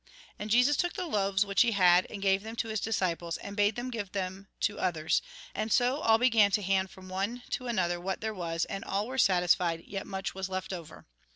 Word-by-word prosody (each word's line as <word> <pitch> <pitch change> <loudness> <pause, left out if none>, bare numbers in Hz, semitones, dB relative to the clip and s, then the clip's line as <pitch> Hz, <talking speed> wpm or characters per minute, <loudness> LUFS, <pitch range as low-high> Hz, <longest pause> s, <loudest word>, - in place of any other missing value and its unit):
And 210 - -5
Jesus 250 +6 +4
took 350 0 0
the 370 -2 -3
loaves 200 - +1
which 200 -1 +2
he 240 -2 +4
had, 180 -2 +5
and 200 -2 -7
gave 195 0 +3
them 220 +2 -7
to 230 - -2
his 220 -1 -1
disciples, 175 -6 -1
and 200 - -8
bade 205 0 +2
them 245 +1 -4
give 205 -5 -5
them 190 0 -4
to 205 - 0
others; 160 -3 +1 0.3
and 215 +1 -3
so 250 +5 +3
all 225 -6 +4
began 225 -4 +4
to 210 - +2
hand 190 0 +1
from 185 0 -13
one 200 +7 -3
to 250 - -3
another 175 -6 0
what 190 +2 -3
there 220 0 -3
was, 170 -3 -2
and 195 - -5
all 200 +2 -1
were 260 +3 -4
satisfied, 175 -3 +3
yet 195 -1 -6
much 190 -1 -4
was 190 0 -4
left 185 0 -4
over. 170 -4 -9
195 Hz, 225 wpm, -30 LUFS, 185-225 Hz, 0.3 s, had